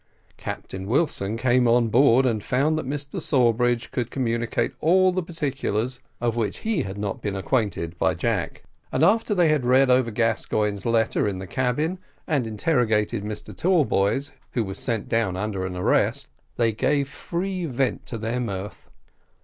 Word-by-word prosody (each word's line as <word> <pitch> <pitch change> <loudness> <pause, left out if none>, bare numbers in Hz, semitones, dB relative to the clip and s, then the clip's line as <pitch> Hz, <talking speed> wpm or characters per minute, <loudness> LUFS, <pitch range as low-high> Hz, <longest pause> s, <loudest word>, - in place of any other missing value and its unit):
Captain 95 0 -6
Wilson 115 -5 0
came 125 +1 +3
on 120 0 +4
board, 130 +2 +5
and 110 -5 0
found 145 +5 +1
that 155 -4 -3
Mr 145 +1 -4
Sawbridge 120 -2 +2
could 120 -1 -2
communicate 115 -3 -1
all 185 +3 +4
the 185 +1 -1
particulars 140 - -2 0.2
of 120 -1 0
which 115 -3 -2
he 220 -8 +1
had 100 -4 -5
not 100 -1 -3
been 100 -2 -3
acquainted 95 -5 -1
by - - +2
Jack; - - -2 0.3
and 130 - +1
after 215 +2 +2
they 175 -4 +4
had 150 -4 +2
read 130 +1 +4
over 125 -1 +3
Gascoigne's 110 -2 0
letter 115 -2 +2
in 100 -2 -2
the 95 - -6
cabin, 130 - -1 0.3
and 140 -7 0
interrogated 110 -3 +1
Mr 105 0 -6
Tallboys, 145 - +1 0.2
who 120 - +1
was 95 -1 -6
sent 115 -5 -2
down 110 -5 0
under 95 -2 -2
an 90 - -6
arrest, 90 - +1 0.3
they 115 -1 +3
gave 140 +6 +1
free 180 +5 -3
vent 130 -1 -1
to 115 - -4
their 115 +3 -2
mirth. 100 -4 -5
120 Hz, 165 wpm, -24 LUFS, 105-140 Hz, 0.3 s, board